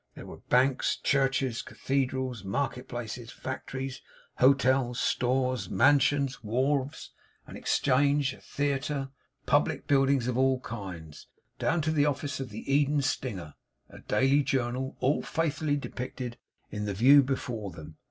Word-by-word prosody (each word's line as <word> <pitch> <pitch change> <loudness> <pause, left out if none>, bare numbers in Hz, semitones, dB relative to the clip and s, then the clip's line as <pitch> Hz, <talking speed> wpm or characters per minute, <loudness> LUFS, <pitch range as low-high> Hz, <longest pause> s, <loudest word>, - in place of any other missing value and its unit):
There - - -9
were - - -10
banks, 130 +1 +3
churches, 135 -3 +1
cathedrals, 130 -4 -2
market 125 +5 -2
places, 120 -1 -6
factories, 130 0 -6 0.4
hotels, 130 -2 +3
stores, 125 -5 0
mansions, 140 +2 +3
wharves; 130 +5 -1 0.3
an - - -11
exchange, 140 0 +2
a - - -15
theatre; 140 -1 -2 0.4
public - - +1
buildings 135 -3 +3
of 125 0 0
all 130 -1 +3
kinds, 90 -10 -8 0.3
down 165 +1 +1
to 155 - +1
the 150 -2 +3
office 145 0 -2
of 135 -2 -5
the 105 +1 -7
Eden 145 0 +3
Stinger, 95 - -3 0.4
a - - -12
daily 135 +2 +2
journal; 130 -1 -2
all 135 +4 +2
faithfully 155 -2 -1
depicted 125 -3 -6 0.3
in 105 0 -3
the 100 -1 -3
view 135 +7 +7
before 125 -6 -3
them. 80 -2 -11
130 Hz, 135 wpm, -28 LUFS, 120-140 Hz, 0.4 s, view